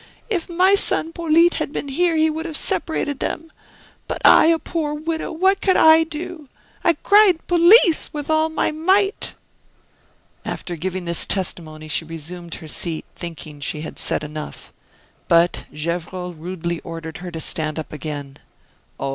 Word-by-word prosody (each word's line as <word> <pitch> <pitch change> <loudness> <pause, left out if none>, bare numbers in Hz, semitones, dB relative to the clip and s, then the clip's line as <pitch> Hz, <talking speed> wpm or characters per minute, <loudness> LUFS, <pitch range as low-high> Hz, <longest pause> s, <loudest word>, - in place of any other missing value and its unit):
If 360 -4 -1
my 365 +3 +3
son 330 -4 +1
Polyte 335 +1 +3
had - - -3
been 290 - -4
here 340 +4 +1
he 315 0 +3
would 320 +1 -3
have 315 -2 -4
separated 290 -3 -2
them; 325 0 -4 0.6
but - - -3
I, - - +8
a 330 0 +4
poor 310 -2 -3
widow, 320 +1 -3
what 380 +4 +2
could 375 - +3
I 320 0 +6
do! 320 -2 -7 0.3
I 340 - +4
cried 395 0 +4
'Police!' 350 0 +5
with 295 -1 -5
all 315 0 +2
my 315 - 0
might." 380 +6 +1 1.1
After 175 - -5
giving 185 +2 -4
this 170 0 0
testimony 155 -5 -2
she 155 +2 0
resumed 165 +2 -7
her 160 - -10
seat, 160 +1 -3
thinking 160 -4 -8
she 150 +1 -3
had 155 - -7
said - - 0
enough. 150 0 -8 0.5
But 170 +1 +3
Gevrol 175 +3 -4
rudely 170 +1 -4
ordered 165 -1 -8
her 180 0 -7
to 165 -2 -6
stand 155 -1 0
up 160 - -6
again. 145 -2 -6 0.6
"Oh! 135 - -2
270 Hz, 160 wpm, -21 LUFS, -, 1.1 s, I